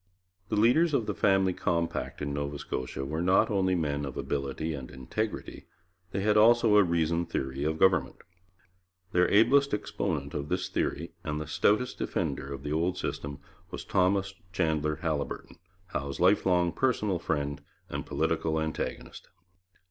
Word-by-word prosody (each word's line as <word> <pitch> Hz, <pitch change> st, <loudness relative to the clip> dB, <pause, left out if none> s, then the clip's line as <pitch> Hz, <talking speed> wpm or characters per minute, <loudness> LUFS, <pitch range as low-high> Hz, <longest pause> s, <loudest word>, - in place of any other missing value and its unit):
The -, -, 0 dB
leaders 140 Hz, +9 st, +4 dB
of 120 Hz, -, +1 dB
the 105 Hz, -, -2 dB
Family 95 Hz, -1 st, +3 dB
Compact 85 Hz, -3 st, -2 dB
in 70 Hz, -1 st, -2 dB
Nova 70 Hz, 0 st, -3 dB
Scotia 70 Hz, -1 st, -4 dB
were 80 Hz, +4 st, -2 dB
not 95 Hz, +4 st, +3 dB
only 95 Hz, -2 st, +2 dB
men 75 Hz, -4 st, -1 dB
of 70 Hz, -3 st, -5 dB
ability 70 Hz, +3 st, -2 dB
and 65 Hz, -4 st, -7 dB
integrity, 105 Hz, -, -4 dB, 0.4 s
they 95 Hz, +1 st, -2 dB
had 105 Hz, +1 st, +3 dB
also 115 Hz, 0 st, +6 dB
a 105 Hz, -, +7 dB
reasoned 85 Hz, -1 st, 0 dB
theory 65 Hz, -2 st, -2 dB
of 80 Hz, +1 st, 0 dB
government. 90 Hz, -7 st, +3 dB, 1.0 s
Their 90 Hz, 0 st, +3 dB
ablest 130 Hz, +6 st, +4 dB
exponent 80 Hz, -9 st, -3 dB
of 70 Hz, +1 st, -4 dB
this 90 Hz, 0 st, -1 dB
theory 80 Hz, +4 st, -2 dB
and 75 Hz, -3 st, -2 dB
the 75 Hz, -, -4 dB
stoutest 105 Hz, +10 st, +1 dB
defender 70 Hz, -, -2 dB
of 70 Hz, -1 st, -6 dB
the 75 Hz, 0 st, -2 dB
old 85 Hz, +3 st, 0 dB
system 70 Hz, 0 st, -4 dB, 0.3 s
was -, -, -7 dB
Thomas 95 Hz, +1 st, +1 dB, 0.2 s
Chandler 80 Hz, -4 st, 0 dB
Haliburton, 75 Hz, -4 st, -3 dB, 0.3 s
Howe's 70 Hz, -4 st, -4 dB
lifelong 90 Hz, -2 st, +3 dB
personal 105 Hz, -3 st, 0 dB
friend 70 Hz, -3 st, -2 dB, 0.3 s
and -, -, -4 dB
political 80 Hz, -1 st, 0 dB
antagonist. 80 Hz, 0 st, -4 dB
85 Hz, 150 wpm, -29 LUFS, 70-100 Hz, 1.0 s, a